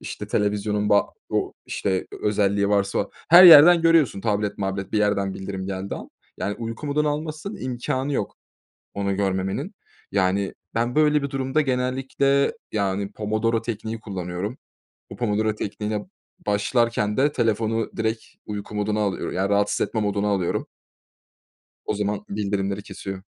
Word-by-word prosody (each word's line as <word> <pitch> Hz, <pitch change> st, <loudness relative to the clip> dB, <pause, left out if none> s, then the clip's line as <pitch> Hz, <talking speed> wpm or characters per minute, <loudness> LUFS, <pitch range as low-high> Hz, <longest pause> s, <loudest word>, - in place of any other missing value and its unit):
işte, -, -, -7 dB
televizyonun 105 Hz, 0 st, 0 dB
ba 100 Hz, 0 st, +4 dB, 0.2 s
o -, -, -1 dB
işte, 95 Hz, -2 st, -1 dB, 0.2 s
özelliği 100 Hz, -1 st, +2 dB
varsa 100 Hz, -1 st, +1 dB, 0.2 s
her 175 Hz, +3 st, +10 dB
yerden 170 Hz, 0 st, +10 dB
görüyorsun, 165 Hz, -11 st, +4 dB
tablet 105 Hz, -1 st, -1 dB
mablet 95 Hz, -1 st, -3 dB
bir 110 Hz, -, +2 dB
yerden 100 Hz, -2 st, +1 dB
bildirim 95 Hz, -1 st, -5 dB
geldiği 95 Hz, 0 st, -4 dB
an. -, -, -9 dB, 0.3 s
Yani 100 Hz, -, -2 dB
uyku 115 Hz, +5 st, -5 dB
moduna 150 Hz, +1 st, +1 dB
almazsan 155 Hz, +6 st, -4 dB
imkânı 130 Hz, +2 st, -3 dB
yok, 105 Hz, -7 st, -2 dB, 0.6 s
onu 100 Hz, -1 st, -1 dB
görmemenin. 95 Hz, -, -2 dB, 0.4 s
Yani 95 Hz, 0 st, +1 dB, 0.2 s
ben 120 Hz, +2 st, 0 dB
böyle 150 Hz, -1 st, +3 dB
bir 140 Hz, -, -2 dB
durumda 135 Hz, +2 st, 0 dB
genellikle, 135 Hz, +1 st, +1 dB, 0.2 s
yani, 100 Hz, -1 st, -1 dB
pomodoro 110 Hz, +2 st, 0 dB
tekniği 110 Hz, 0 st, -4 dB
kullanıyorum. 95 Hz, +2 st, -5 dB, 0.5 s
Bu -, -, -8 dB
pomodoro 110 Hz, -2 st, 0 dB
tekniğine 105 Hz, 0 st, -3 dB, 0.4 s
başlarken 105 Hz, +1 st, +1 dB
de 145 Hz, +3 st, +3 dB
telefonu 115 Hz, -2 st, 0 dB
direkt 110 Hz, 0 st, -1 dB, 0.2 s
uyku 105 Hz, 0 st, -6 dB
moduna 105 Hz, +1 st, 0 dB
alıyor 100 Hz, -3 st, -2 dB
ya, 95 Hz, +2 st, -1 dB
rahatsız 100 Hz, 0 st, +1 dB
etme 110 Hz, -, -2 dB
moduna 105 Hz, 0 st, 0 dB
alıyorum. 95 Hz, -4 st, 0 dB, 1.2 s
O -, -, -1 dB
zaman 105 Hz, 0 st, -2 dB
bildirimleri 100 Hz, -1 st, -2 dB
kesiyor. 95 Hz, -2 st, -7 dB
105 Hz, 140 wpm, -24 LUFS, 100-125 Hz, 1.2 s, her